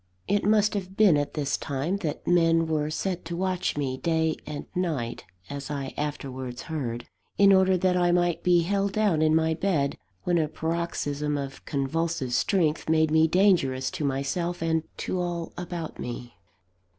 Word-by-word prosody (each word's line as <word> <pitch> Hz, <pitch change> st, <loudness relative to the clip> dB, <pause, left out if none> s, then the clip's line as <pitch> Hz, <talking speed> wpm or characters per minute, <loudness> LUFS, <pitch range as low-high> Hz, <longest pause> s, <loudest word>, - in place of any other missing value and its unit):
It 205 Hz, 0 st, +1 dB
must 210 Hz, 0 st, +3 dB
have 190 Hz, -2 st, -5 dB
been 205 Hz, -7 st, +6 dB
at 145 Hz, 0 st, -1 dB
this 145 Hz, -3 st, -1 dB
time 145 Hz, +7 st, -2 dB
that 160 Hz, -6 st, -4 dB
men 165 Hz, -1 st, +4 dB
were 155 Hz, -2 st, 0 dB
set 180 Hz, +3 st, -2 dB
to 170 Hz, +1 st, -4 dB
watch 185 Hz, -3 st, -1 dB
me 130 Hz, -3 st, -1 dB
day 160 Hz, 0 st, +1 dB
and 150 Hz, -1 st, -5 dB
night 155 Hz, -10 st, -2 dB, 0.2 s
(as 140 Hz, -1 st, -6 dB
I 140 Hz, -2 st, -4 dB
afterwards 130 Hz, -4 st, -4 dB
heard), 120 Hz, -7 st, -4 dB, 0.3 s
in 200 Hz, 0 st, +7 dB
order 190 Hz, -1 st, +4 dB
that 180 Hz, 0 st, +2 dB
I 175 Hz, -1 st, +3 dB
might 175 Hz, -1 st, +2 dB
be 175 Hz, -1 st, +4 dB
held 200 Hz, +3 st, 0 dB
down 205 Hz, -8 st, +2 dB
in 155 Hz, 0 st, +4 dB
my 160 Hz, 0 st, +2 dB
bed, 160 Hz, -5 st, 0 dB, 0.2 s
when 175 Hz, -1 st, +2 dB
a 155 Hz, -, +1 dB
paroxysm 150 Hz, -3 st, -2 dB
of 135 Hz, -1 st, -6 dB
convulsive 140 Hz, -1 st, -1 dB
strength 160 Hz, -, +1 dB
made 160 Hz, -1 st, +3 dB
me 160 Hz, 0 st, +5 dB
dangerous 160 Hz, -8 st, +2 dB
to -, -, -4 dB
myself 145 Hz, +6 st, -1 dB
and 160 Hz, 0 st, +1 dB, 0.2 s
to 185 Hz, -, -2 dB
all 175 Hz, -2 st, -3 dB
about 175 Hz, -2 st, -6 dB
me. 120 Hz, 0 st, -6 dB
160 Hz, 170 wpm, -26 LUFS, 145-180 Hz, 0.3 s, in